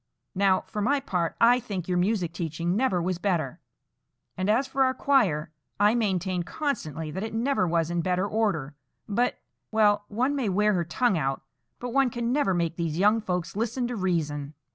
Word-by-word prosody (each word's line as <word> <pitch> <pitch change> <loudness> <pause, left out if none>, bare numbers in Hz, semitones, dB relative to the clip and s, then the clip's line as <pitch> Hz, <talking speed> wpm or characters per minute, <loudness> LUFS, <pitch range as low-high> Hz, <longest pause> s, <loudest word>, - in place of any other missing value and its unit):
Now, 190 -1 +3
for 210 - -5
my 280 +7 +2
part, 180 -9 -2
I 240 +2 +6
think 200 -8 -5
your 180 -1 +1
music 180 -3 0
teaching 170 +1 -2
never 220 -6 +2
was 175 0 -1
better; 170 -9 -1 0.8
and 185 +2 -1
as 235 +6 +3
for 270 0 +1
our 260 0 +1
choir, 185 - +2 0.3
I 205 +1 +5
maintain 190 -5 0
constantly 160 - -3
that 190 - -4
it 220 +1 -4
never 235 -4 +1
was 165 0 0
in 175 0 0
better 185 +3 0
order, 170 -10 -1 0.3
but—Well, 210 -2 0
one 255 +7 0
may 255 -7 0
wear 210 +3 +2
her 175 -3 0
tongue 195 +1 +1
out, 135 -2 -2 0.3
but 245 -1 -6
one 270 -1 +3
can 240 0 -2
never 260 -10 +2
make 170 -1 -1
these 165 -2 -2
young 210 +4 +4
folks 180 -4 -3
listen 235 +3 -1
to 245 - -3
reason." 155 -7 -2
195 Hz, 185 wpm, -26 LUFS, 170-230 Hz, 0.8 s, I